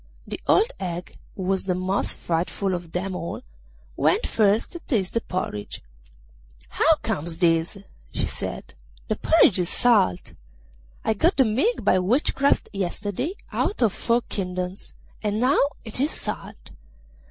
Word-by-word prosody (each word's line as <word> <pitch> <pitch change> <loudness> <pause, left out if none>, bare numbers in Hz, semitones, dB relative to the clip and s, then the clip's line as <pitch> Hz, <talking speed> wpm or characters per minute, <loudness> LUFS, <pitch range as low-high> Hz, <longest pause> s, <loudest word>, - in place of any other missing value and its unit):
The - - -6
old 450 +4 +4
hag, 175 -1 -5 0.2
who 190 - -5
was 190 +1 0
the 185 -2 0
most 185 +2 0
frightful 180 +3 -1
of 175 -2 -5
them 185 +2 -2
all, 170 - -5 0.5
went - - +2
first 210 0 +2
to 345 - -7
taste 215 - -1
the 230 - +1
porridge. 145 - -4 0.9
'How - - +4
comes 160 +2 -2
this?' 165 +2 +2 0.3
she - - -1
said; - - -5 0.4
'the - - 0
porridge 250 - +4
is 175 -1 0
salt! 210 - +2 0.7
I 220 - +3
got 325 - +2
the 265 - +6
milk 260 - +1
by 185 - +4
witchcraft 270 +7 +2
yesterday 205 - -2 0.2
out 400 - 0
of 215 -4 +3
four 235 +1 +1
kingdoms, 180 -1 -4 0.3
and 210 0 -1
now 255 +4 +3 0.3
it 220 +2 -3
is 285 +3 +2
salt! - - -6
195 Hz, 145 wpm, -24 LUFS, 180-235 Hz, 0.9 s, the